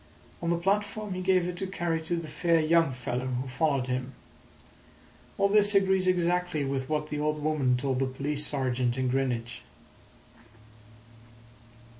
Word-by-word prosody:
On 170 - -1
the 170 - +2
platform 205 +2 -1
he 185 - -4
gave 185 -1 +2
it 180 0 -5
to 190 - -3
carry 170 -3 -2
to 175 - -1
the 165 -1 -4
fair 165 +2 +1
young 165 -1 +3
fellow 125 0 -3
who 130 +1 -3
followed 135 0 0
him. 130 +1 -3 1.2
All 200 - +3
this 205 0 +4
agrees 190 -1 +3
exactly 180 -4 +1
with 135 -1 -3
what 150 0 -1
the 150 - -2
old 150 0 -1
woman 140 -5 +2
told 130 0 -1
the 135 - +1
police 145 +3 -2
sergeant 130 -3 -1
in 130 -1 0
Greenwich." 125 -3 -2
150 Hz, 155 wpm, -28 LUFS, 130-180 Hz, 1.2 s, this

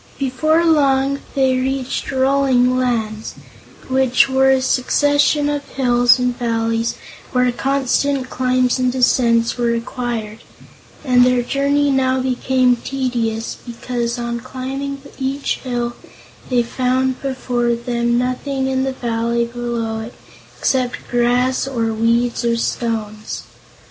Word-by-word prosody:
Before 310 +5 +1
long 275 -3 +3 0.2
they 265 -2 +2
reached 265 +1 -2
Rolling 260 -2 +2
Lands, 225 -4 -2 0.5
which 260 0 +3
were 265 0 +3
a 265 0 +4
succession 290 +3 +2
of 290 -1 -1
hills 245 -2 +3
and 250 -1 0
valleys 230 -1 -1 0.4
where 250 -1 +3
constant 270 +1 0
climbs 255 0 +1
and 255 0 +2
descents 235 -2 +2
were 240 - +1
required, 235 -2 -3 0.7
and 250 -2 +5
their 250 -1 +3
journey 280 +2 +1
now 260 -1 +2
became 255 -1 +1
tedious, 235 -3 -2
because 235 0 -3
on 235 0 -3
climbing 270 +2 -5 0.2
each 275 +1 -2
hill, 240 -2 -3 0.6
they 245 -2 +2
found 255 +2 -1
before 245 -3 -1
them 235 0 -1
nothing 260 +2 -1
in 265 0 0
the 265 0 -1
valley 235 -1 -1
below 235 -2 -3
it 225 +2 -8 0.4
except 255 -2 -1
grass, 245 +2 +1
or 230 -4 -1
weeds 235 +2 +1
or 235 0 +1
stones. 215 -2 -3
250 Hz, 120 wpm, -19 LUFS, 235-265 Hz, 0.7 s, and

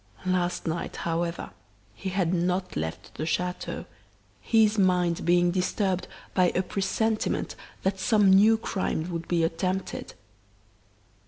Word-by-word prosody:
Last 180 -1 0
night, 170 +1 -3
however, 170 0 -2 0.4
he 115 - -5
had 185 -2 0
not 180 +1 0
left 80 +1 -4
the 155 - -4
chateau, 180 +2 -2 0.5
his 220 - +3
mind 180 -3 +2
being 175 0 +4
disturbed 185 0 0 0.3
by 180 -2 +4
a 185 - +2
presentiment 215 +4 -1 0.3
that 190 0 0
some 205 0 +4
new 210 +4 +6
crime 180 -5 -2
would 165 -1 -4
be 170 -2 +1
attempted. 185 +3 -2
180 Hz, 120 wpm, -27 LUFS, 170-195 Hz, 0.5 s, new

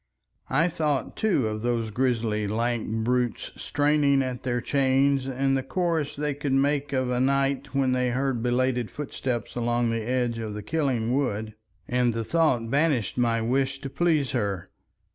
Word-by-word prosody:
I 150 +6 +3
thought 150 -5 -1
too 190 - +1
of 110 0 -3
those 115 -2 -1
grisly 115 -3 0
lank 115 +2 -1
brutes 125 -1 0
straining 145 -2 +2
at 130 -1 -4
their 120 -2 -1
chains 135 +1 +2
and 135 +1 +1
the 135 - +1
chorus 160 -2 -1
they 150 0 -1
could 145 -1 -2
make 140 +1 +1
of 130 -2 0
a 125 - 0
night 135 +1 0
when 135 -2 +2
they 125 0 +1
heard 130 -1 -1
belated 125 -1 +1
footsteps 130 -5 -4
along 120 -1 +1
the 115 0 -1
edge 120 0 -1
of 110 -2 -4
the 105 - -6
Killing 130 -7 0
Wood, 110 -6 -1 0.3
and 125 -2 +1
the 115 - -1
thought 125 -6 +1
banished 140 - +1
my 115 -2 +2
wish 135 +3 0
to 135 -2 -6
please 155 -3 +1
her. 100 -8 -1
130 Hz, 165 wpm, -26 LUFS, 120-140 Hz, 0.3 s, I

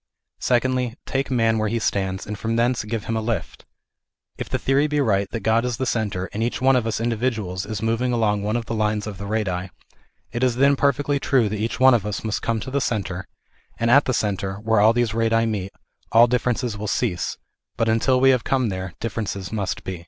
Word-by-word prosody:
Secondly, 125 -1 +1
take 135 0 -2
man 115 -3 +2
where 110 -1 0
he 115 - -1
stands, 95 -4 -1
and 105 - -5
from 115 +2 -2
thence 120 +1 +1
give 105 0 -3
him 115 - -2
a 110 - 0
lift. 110 0 -4 0.7
If - - -6
the - - 0
theory 140 +3 +2
be 150 0 0
right, 100 -7 +1
that 115 - -4
God 115 +1 +2
is 125 -2 -2
the 130 - -1
centre, 105 -6 -1
and 105 - -3
each 120 +1 -1
one 135 +1 +4
of 120 -3 +1
us 110 - -1
individuals 110 -5 -2
is 110 0 -4
moving 115 +3 0
along 105 -4 +1
one 105 +2 -1
of 120 -1 -2
the 115 - -4
lines 105 -1 0
of 105 -4 -7
the 100 - -5
radii, 95 -4 -2 0.6
it 120 - -2
is 125 -2 +2
then 140 +2 +4
per 140 +1 +3
fectly 140 +1 -2
true 125 -5 +3
that 105 0 -3
each 110 +2 -2
one 130 0 +7
of 115 -5 +2
us 105 0 -4
must 110 -2 -2
come 115 -1 -1
to 130 - -6
the 140 +1 0
centre; 95 -7 -2 0.5
and 115 +1 +1
at 140 +3 +6
the - - 0
centre, 100 -2 -1
where 110 +1 +1
all 110 +2 +6
these 120 -2 0
radii 115 0 +2
meet, 100 -4 -3 0.4
all 115 +1 +7
differences 125 -1 0
will 105 +1 -5
cease, 95 -6 -1 0.4
but 115 - +1
until 115 +3 +3
we 135 +1 +6
have 125 -3 +1
come 130 -4 +1
there 95 -2 -5
differences 100 -4 -4
must 100 -4 -3
be. 95 -2 -5
115 Hz, 230 wpm, -23 LUFS, 105-125 Hz, 0.7 s, one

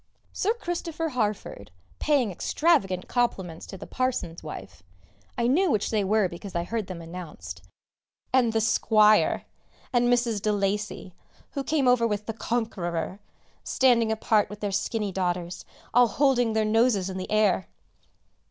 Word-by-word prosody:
Sir 435 +4 0
Christopher 335 -5 -3
Harford 210 - -3 0.3
paying 275 -8 +2
extravagant 195 - +1
compliments 190 -9 -1
to 195 - -8
the - - -9
parson's 255 -10 -2
wife 150 - -9 0.6
(I 235 - +1
knew 335 +10 +3
which 215 -7 0
they 215 -2 +1
were 205 0 +2
because 180 +2 -9
I 170 - 0
heard 215 +2 -3
them 175 -3 -7
announced), 155 - -8 0.7
and 250 -3 +4
the 225 0 +1
"Squire" 215 -1 +4 0.5
and 245 0 +3
Mrs. 235 -4 +1
de 215 - +1
Lacy 205 -2 -2 0.4
who 275 - -3
came 290 -3 +1
over 245 -2 +4
with 210 -1 -2
the 225 - -3
Conqueror 200 -6 -2 0.4
standing 235 -4 +3
apart 215 -1 +2
with 205 +1 -9
their 205 -1 -1
skinny 205 +1 -1
daughters, 175 -1 -2 0.3
all 245 +1 +6
holding 245 -1 +2
their 220 0 +2
noses 215 -3 +2
in 190 -1 -5
the 185 - -5
air. 210 -4 +2
215 Hz, 150 wpm, -26 LUFS, 190-245 Hz, 0.7 s, all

